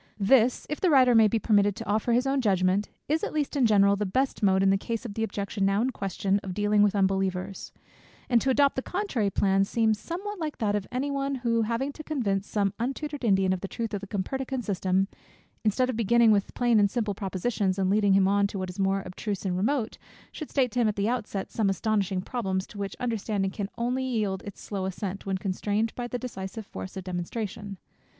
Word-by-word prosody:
This, 240 +4 +4
if 300 - -4
the 370 - +3
writer 260 -4 +6
may 225 -2 +7
be 225 - +1
permitted 205 -2 +3
to 225 +1 -7
offer 215 +3 0
his 245 +3 +3
own 270 0 +1
judgment, 190 -2 +2 0.2
is 315 +2 0
(at - - -2
least 300 -1 -1
in 265 -4 +4
general) 200 -2 +5
the 205 - -2
best 260 +8 0
mode, 190 -2 +3
in 195 - +5
the - - +4
case 230 +2 -4
of 220 - -5
the 225 - -2
objection 200 -1 -3
now 195 +1 +2
in 250 +4 +1
question, 195 -2 -1
of 185 -2 -6
dealing 205 0 +3
with 205 0 +3
unbelievers; 190 -1 -1 0.6
and 240 -2 +3
to 270 - 0
adopt 280 +1 +3
the 260 - -1
contrary 280 - -1
plan, 195 0 +2
seems 220 +1 +1
somewhat 395 - -5
like 310 -2 -4
that 210 -3 0
of 205 -2 -2
any 265 +3 -1
one, 275 0 -1
who 230 -1 +2
having 235 +5 -1
to 310 - -9
convince 205 -11 -1
some 200 -2 0
untutored 275 +3 -3
Indian 190 -4 +3
of 185 - -4
the 195 - -4
truth 225 +2 -4
of 200 - -2
the 200 - -8
Copernican 260 +6 -3
system, 190 -1 0 0.6
instead 225 +4 +2
of 255 - -2
beginning 230 +1 +4
with 200 -2 +1
plain 240 -3 +3
and 200 -1 +4
simple 215 -2 -1
propositions, 195 0 -1
and 190 -1 +1
leading 205 -1 +3
him 190 -1 +4
on 200 0 +3
to 200 - -6
what 185 -1 -3
is 185 - -12
more 195 0 +1
abstruse 195 +2 -4
and 180 -2 0
remote, 225 +4 -1 0.3
should 310 - -7
state 260 -4 +1
to 250 - -1
him 230 - +3
at 210 - 0
the 200 +1 0
outset 225 -5 -3
some 215 -3 +1
astonishing 195 -1 0
problems, 190 -6 -2
to 205 - -11
which 200 -1 -4
the - - -9
understanding 210 -4 -1
can 200 -1 -4
only 250 +2 -1
yield 215 -7 -1
its 200 - -8
slow 195 -2 -4
assent, 190 +1 -5
when 190 -1 0
constrained 205 +3 -1
by 245 -1 -4
the 245 - -3
decisive 220 -4 -6
force 95 - -8
of 190 - -5
demonstration. 195 +2 -5
210 Hz, 230 wpm, -27 LUFS, 195-245 Hz, 0.6 s, may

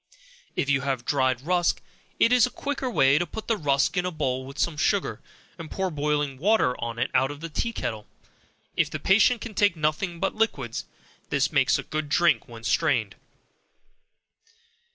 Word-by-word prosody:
If - - 0
you 145 -2 +2
have 130 -3 -2
dried 130 -3 +1
rusk, 175 +3 +1 0.4
it 235 - +5
is 250 -1 +5
a - - -7
quicker 275 0 -3
way 140 - +4
to 175 - -1
put 220 - -7
the 225 - +2
rusk 140 -6 +1
in 180 - +2
a 180 - -1
bowl 130 -6 -2
with 135 +2 -10
some 165 0 0
sugar, 145 - 0 0.4
and 160 -2 -7
pour 190 -1 -2
boiling 145 -2 -1
water 195 -8 +3
on 115 -1 -4
it 125 +2 -1
out 135 - +3
of 145 0 -7
the 165 +2 -6
tea 230 +8 -2
kettle. 110 - -4 0.7
If - - +2
the - - -4
patient 220 +4 +4
can 235 - -7
take 205 -2 +3
nothing 160 +3 -1
but 195 - 0
liquids, 140 - -1 0.4
this - - +1
makes - - +3
a - - -5
good 155 -1 -4
drink 170 0 +3
when 115 -2 -11
strained. - - +1
155 Hz, 185 wpm, -26 LUFS, 135-190 Hz, 0.7 s, it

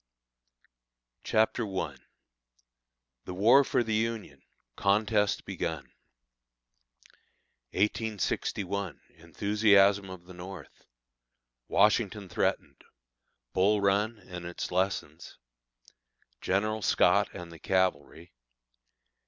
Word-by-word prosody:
CHAPTER 110 +2 +1
I. - - -2 1.3
THE 90 - -6
WAR 115 +9 +6
FOR 125 - +1
THE 110 -1 -2
UNION. 110 -10 -2 0.3
CONTEST 105 +1 +1
BEGUN. - - -4 1.8
1861. 100 -2 -2 0.2
Enthusiasm 100 +3 +3
of 90 -2 -10
the 90 - -12
North. 90 -2 -11 0.8
Washington 105 -2 +2
Threatened. - - -2 0.7
Bull 100 +3 +3
Run, 100 +3 +1
and 90 -3 -9
Its 85 0 -5
Lessons. 95 +2 -2 1.0
General 110 +3 0
Scott - - +3
and 85 -1 -8
the 80 - -12
Cavalry. 85 -3 -1
100 Hz, 80 wpm, -29 LUFS, 90-105 Hz, 1.8 s, WAR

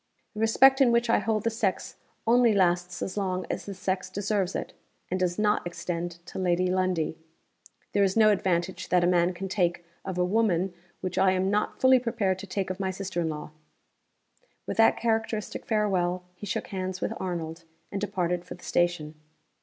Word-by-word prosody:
The 210 - -7
respect 265 +5 +5
in 250 -3 +6
which 235 0 +2
I - - +4
hold 215 -2 0
the 230 - +1
sex 210 -4 -2 0.3
only 235 0 +5
lasts 180 -2 +1
as 190 - -5
long 185 -2 -1
as - - -4
the 200 - -5
sex 185 0 -2
deserves 200 -2 -1
it - - -4 0.4
and 185 - 0
does 180 -1 0
not 210 0 +2
extend 170 0 -4
to - - -7
Lady 180 -1 +2
Lundie. 185 -4 0 0.7
There 200 - +4
is 195 +2 +1
no 215 -1 +6
advantage 185 -2 -1
that 180 -1 +3
a - - +4
man 175 0 +3
can 190 +2 -5
take 175 -3 0 0.2
of 185 -2 -5
a 180 - +2
woman 190 -3 +1 0.3
which 185 -1 -2
I 190 -1 +4
am 190 +1 +1
not 210 +1 0
fully 260 0 +6
prepared 225 -6 -1
to 200 - -8
take 185 0 -2
of 185 - -6
my 190 -1 -1
sister 190 -2 -3
in 165 - 0
law." 150 0 -6 1.1
With - - -4
that 225 0 +5
characteristic 225 -2 -2
farewell, 185 -5 +1
he 205 +3 -9
shook 190 - -3
hands 185 -1 -3
with - - -2
Arnold, 165 -2 -4 0.3
and 195 - -3
departed 180 -4 -1
for 180 - -8
the 180 - -18
station. 175 -3 0
185 Hz, 195 wpm, -27 LUFS, 175-210 Hz, 1.1 s, in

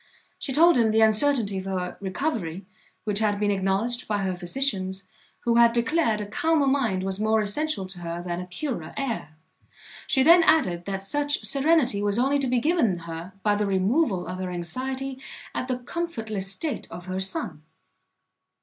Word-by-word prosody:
She 275 - -3
told 325 +1 +5
him 225 -2 +4
the 220 +1 +3
uncertainty 220 -2 +3
of 190 - -7
her 185 -2 -3
recovery 195 - -3 0.4
which 210 -1 -1
had 210 -2 +1
been 205 -1 +2
acknowledged 200 +5 0
by 205 -2 -1
her 190 -1 0
physicians, 190 -1 -2 0.3
who 235 0 +2
had 235 0 +6
declared 235 -1 +1
a - - -3
calmer 305 +8 +1
mind 245 -9 +1
was 190 0 -2
more 220 +1 +2
essential 215 +1 -1
to 185 -1 -8
her 170 0 -4
than 175 0 -4
a 180 - -8
purer 185 - -5
air. 230 - -3 0.7
She 265 - +3
then 340 +4 +8
added, 210 - +3
that 195 -1 -3
such 290 +7 -1
serenity 280 -7 +3
was 205 0 0
only 275 +3 +2
to 270 - 0
be 250 0 +1
given 290 - +2
her, 170 +2 -7
by 210 - +3
the 205 0 0
removal 195 - +1
of 185 +2 -6
her 185 -1 -3
anxiety 260 +10 -4 0.3
at 255 - -3
the 255 -1 -1
comfortless 225 - -4
state 295 +9 -4
of 175 - -8
her 185 0 -3
son. 190 -5 -2
215 Hz, 175 wpm, -25 LUFS, 190-270 Hz, 0.7 s, then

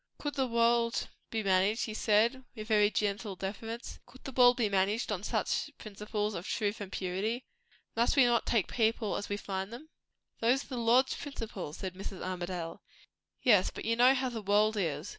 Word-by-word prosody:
"Could 290 -1 -4
the 265 -2 0
world 235 0 +2 0.2
be 220 -1 -2
managed," 195 +3 +2
he 220 - -5
said, 225 +5 +2
with 215 -2 -7
very 210 -2 +4
gentle 205 -1 -2
deference; 225 +5 -6
"could 260 - -17
the 270 - -6
world 245 -1 +6
be 235 -4 +2
managed 200 +3 +1
on 190 -3 -2
such 210 - -1
principles 210 0 -3
of 180 0 -5
truth 210 -1 -1
and 195 -2 -6
purity? 200 +7 -2 0.5
Must 235 +4 +2
we 270 -3 +6
not 240 -1 +2
take 225 -6 +2
people 225 -2 0
as - - -4
we 205 - -1
find 195 0 -4
them?" 295 +7 -10 0.5
"Those 245 +4 +2
are - - -20
the 255 - -4
Lord's 240 +3 +3
principles," 220 - -6
said 185 -2 -5
Mrs. 190 0 -7
Armadale. 175 -2 -4 0.6
"Yes, 210 -8 +5
but - - -8
you 230 +1 +2
know 250 +3 +6
how 260 -1 0
the 230 -2 -5
world 210 +2 +3
is. 165 -3 -2
215 Hz, 190 wpm, -31 LUFS, 195-235 Hz, 0.6 s, world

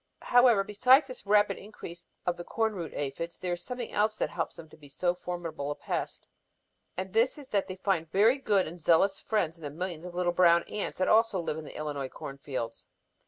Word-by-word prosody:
"However, 245 -4 +5
besides 250 +8 +5
this 255 -6 -10
rapid 205 -1 +3
increase 175 -4 -10 0.2
of 180 - +1
the 175 - -7
corn 220 +3 0
root 170 -5 -5
aphids, 145 +4 -4
there 180 -1 -2
is 175 - -4
something 245 -2 -5
else 215 +1 +1
that - - -1
helps 170 - -3
them 165 - -11
to - - -15
be 145 -2 -15
so 175 +5 0
formidable 170 -5 -5
a 145 - -2
pest. - - -4 0.7
And 185 0 -4
this 230 +6 +3
is 280 -3 -11
that 200 -2 +1
they 185 - -5
find 185 -4 -1
very 220 - +4
good 205 -7 +2
and 170 +2 -8
zealous 175 +5 +3
friends 170 -7 -1
in - - -14
the 145 - -3
millions 170 +2 -5
of 180 -1 -8
little 175 -1 +1
brown 170 -1 +5
ants 210 - -4
that 185 - +1
also 225 -3 +4
live 165 -2 -2
in 155 - -8
the - - -9
Illinois 145 -3 -3
corn 140 +1 -8
fields. 120 -5 -5
180 Hz, 220 wpm, -29 LUFS, 165-210 Hz, 0.7 s, However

